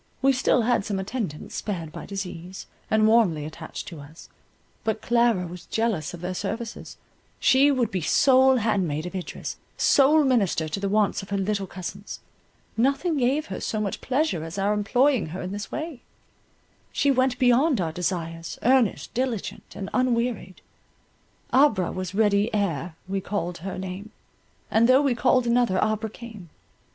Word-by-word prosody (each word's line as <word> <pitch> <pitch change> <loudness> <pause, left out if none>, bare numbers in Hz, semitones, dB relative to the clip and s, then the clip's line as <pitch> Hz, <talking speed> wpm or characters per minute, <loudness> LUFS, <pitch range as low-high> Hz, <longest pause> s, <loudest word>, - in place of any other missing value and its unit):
We 270 0 +5
still 250 -2 +2
had 240 -3 +2
some 200 -1 -2
attendants 190 - -4
spared 170 -7 -4
by - - -8
disease, 185 -2 -6 0.2
and 215 0 +3
warmly 200 -10 +3
attached 155 +1 -8
to 165 - -10
us. 145 +3 -13 0.5
But 220 -1 -1
Clara 235 -6 +2
was 175 0 -9
jealous 210 -8 -1
of 170 - -12
their 180 +1 -3
services; 230 +5 -5 0.4
she 270 +2 +5
would 255 -6 +1
be 185 - -2
sole 265 - +5
handmaid 180 - 0
of 180 - -6
Idris, 185 -2 -5 0.2
sole 295 +3 +5
minister 205 - +1
to 155 +6 -3
the 200 0 -1
wants 210 0 +1
of 195 - -11
her 200 - -1
little 195 0 -1
cousins; 190 +3 -7 0.6
nothing 280 +7 +1
gave 275 +4 +1
her - - -6
so 215 - -2
much 200 -3 -3
pleasure 260 - 0
as 165 +3 -7
our 200 +2 +1
employing 245 - +2
her 175 +4 -6
in 185 - -5
this 205 0 -6
way; 310 -5 -5 0.9
she 285 - +2
went 255 -1 +2
beyond 255 +2 +3
our 165 -3 -1
desires, 165 -1 -4
earnest, 250 -4 +2
diligent, 245 -4 -3
and 195 - -5
unwearied,— 235 -6 -1 0.9
Abra 255 - +4
was 185 0 -5
ready 205 0 +2
ere 170 -5 -1
we 195 0 -2
called 180 -3 -3
her 185 +3 -5
name, 190 +3 -6 0.6
And 230 +2 +4
though 260 +3 +6
we 275 -3 +2
called 250 +1 +2
another, 235 -5 +2
Abra 215 +1 0
came. 215 -6 -11
210 Hz, 165 wpm, -25 LUFS, 185-245 Hz, 0.9 s, though